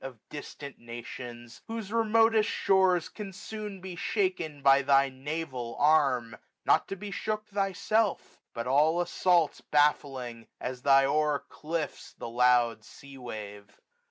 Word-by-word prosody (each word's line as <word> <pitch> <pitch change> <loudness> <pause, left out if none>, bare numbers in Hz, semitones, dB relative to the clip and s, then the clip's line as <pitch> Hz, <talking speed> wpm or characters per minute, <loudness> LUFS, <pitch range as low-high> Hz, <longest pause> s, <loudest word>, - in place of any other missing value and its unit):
Of 135 -3 -7
distant 145 -1 -9
nations; 120 0 -9
whose 225 -2 -5
remotest 225 -1 +3
shores 185 -3 +3
Can 205 -3 -8
soon 205 0 -7
be 185 -1 -7
shaken 175 -8 -2
by 135 0 +6
thy 140 0 +4
naval 130 -3 -5
arm; 135 -7 +3 0.3
Not - - +3
to 195 - -4
be 205 +1 -7
shook 215 +1 -3
thyself; 200 +1 -1
but 115 0 -5
all 150 +6 +3
assaults 175 -2 +2
Baffling, 135 -5 0
as 125 0 -5
thy 135 0 +5
hoar 150 0 +1
cliffs 160 0 -5
the - - -7
loud 120 -2 +3
sea 140 +4 -13
wave. 105 -4 -9
145 Hz, 130 wpm, -29 LUFS, 125-190 Hz, 0.3 s, by